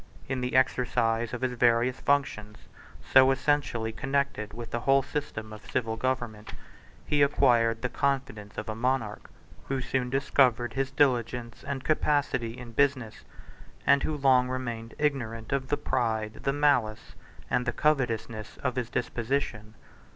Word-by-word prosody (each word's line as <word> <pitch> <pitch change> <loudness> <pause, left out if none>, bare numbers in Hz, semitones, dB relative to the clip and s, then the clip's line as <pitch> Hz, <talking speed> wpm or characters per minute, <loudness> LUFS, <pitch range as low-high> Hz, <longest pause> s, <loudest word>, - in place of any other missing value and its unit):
In 130 -1 -2
the 125 0 -2
exercise 120 -3 +2
of 125 - -5
his 130 -1 0
various 120 +1 +2
functions, 105 -7 0 0.6
so 130 0 +8
essentially 135 -5 0
connected 135 -3 -2
with 115 0 -8
the 120 - -1
whole 135 +3 +3
system 120 -7 -5
of 110 - -12
civil 115 -3 -1
government, 120 -3 -3 0.5
he 145 -1 +1
acquired 120 -5 +3
the - - +2
confidence 130 -7 -2
of - - -4
a 110 - -2
monarch, 115 -2 -2 0.4
who 135 -1 -1
soon 130 0 -1
discovered 125 -3 +2
his 135 +2 -1
diligence 120 -4 0
and 140 -2 -4
capacity 140 -6 0
in 125 -2 -9
business, 130 -3 0 0.6
and 140 0 +5
who 155 - -2
long 130 -2 +4
remained 120 -3 -5
ignorant 120 -6 -2
of 135 -1 -1
the 145 - 0
pride, 110 -4 -1
the 135 - +3
malice, 140 -7 +1 0.3
and 125 0 0
the - - +2
covetousness 115 -7 -1
of 130 -2 -1
his 120 -2 -2
disposition. 115 -3 -2
125 Hz, 145 wpm, -28 LUFS, 115-135 Hz, 0.6 s, so